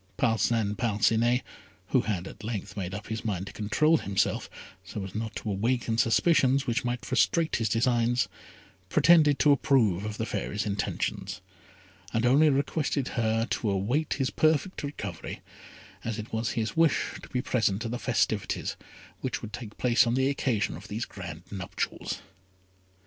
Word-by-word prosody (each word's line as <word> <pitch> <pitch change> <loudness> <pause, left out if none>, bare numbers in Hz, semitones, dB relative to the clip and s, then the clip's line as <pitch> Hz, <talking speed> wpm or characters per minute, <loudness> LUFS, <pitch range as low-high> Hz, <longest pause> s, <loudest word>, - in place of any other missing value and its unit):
Parcin 110 -2 +1
Parcinet, 115 +3 +2 0.5
who - - +4
had 95 -4 -2
at 105 - -11
length 100 -2 -4
made 95 -3 -3
up 105 - -6
his 110 0 -3
mind 100 -5 -2
to 95 - -9
control 155 +10 +3
himself, 100 -6 0 0.3
so 95 +1 -6
as 95 -1 -7
not 110 +1 -4
to 105 - -3
awaken 115 +3 0
suspicions 130 - +3
which 120 -3 0
might 120 0 -2
frustrate 160 +5 +2
his 115 -2 0
designs, 120 +1 +2 0.6
pretended 155 - +5
to 150 - +5
approve 125 - +3
of 105 0 -4
the 110 - -1
Fairy's 100 -2 -2
intentions, 100 -1 -2 0.7
and 115 +1 +1
only 145 +5 +6
requested 140 -1 0
her 115 -1 +1
to 110 - 0
await 110 +11 0
his 135 0 -1
perfect 155 +4 +1
recovery, 100 - -6 0.6
as 115 -2 -3
it 110 +1 -7
was 110 0 -1
his 110 -2 -2
wish 165 -3 +3
to - - -12
be 125 0 -1
present 110 -3 +1
at 115 - -3
the 120 - -3
festivities 110 -4 0 0.4
which - - -3
would 105 - -7
take 120 -3 -7
place 125 0 +4
on 120 - +1
the 130 +1 +2
occasion 125 - 0
of 95 +7 -10
these 110 +3 -3
grand 90 -3 -8
nuptials. 95 -3 -4
115 Hz, 160 wpm, -28 LUFS, 105-130 Hz, 0.7 s, only